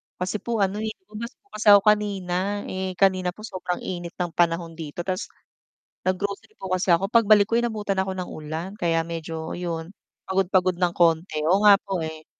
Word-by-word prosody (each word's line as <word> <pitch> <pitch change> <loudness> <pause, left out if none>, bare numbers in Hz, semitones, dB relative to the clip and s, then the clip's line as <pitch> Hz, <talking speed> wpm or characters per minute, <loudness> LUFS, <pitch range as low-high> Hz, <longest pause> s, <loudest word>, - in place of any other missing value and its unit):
Kasi 185 +4 -3
po 230 -2 0
ano, 195 +2 -1
eh, 220 0 -3 0.2
umalis 235 +3 -6
po 405 - -35
ako 205 -1 +7
kanina. 205 -2 +1
Eh, 185 0 -3
kanina 185 -1 +2
po 215 - -12
sobrang 185 -4 -4
init 175 -1 -5
ng 175 -2 -2
panahon 170 0 +1
dito, 160 +1 -6
tas 185 +1 -3 0.8
nag-grocery 200 +3 -2
po 190 -1 -6
kasi 185 0 +1
ako. 190 +4 +1
Pagbalik 215 -3 +5
ko 230 - +2
inabutan 210 -4 -1
ako 190 0 -2
ng 180 - -4
ulan, 155 +4 -5
kaya 165 -1 +1
medyo 165 -1 -5
'yon, 170 -1 -4 0.4
pagod-pagod 185 -1 +2
ng 175 -2 +2
konti. 165 -2 +2
Oo 190 +5 +3
nga 205 -1 +10
po, 195 -3 -3
eh. 160 0 -7
185 Hz, 180 wpm, -24 LUFS, 170-205 Hz, 0.8 s, nga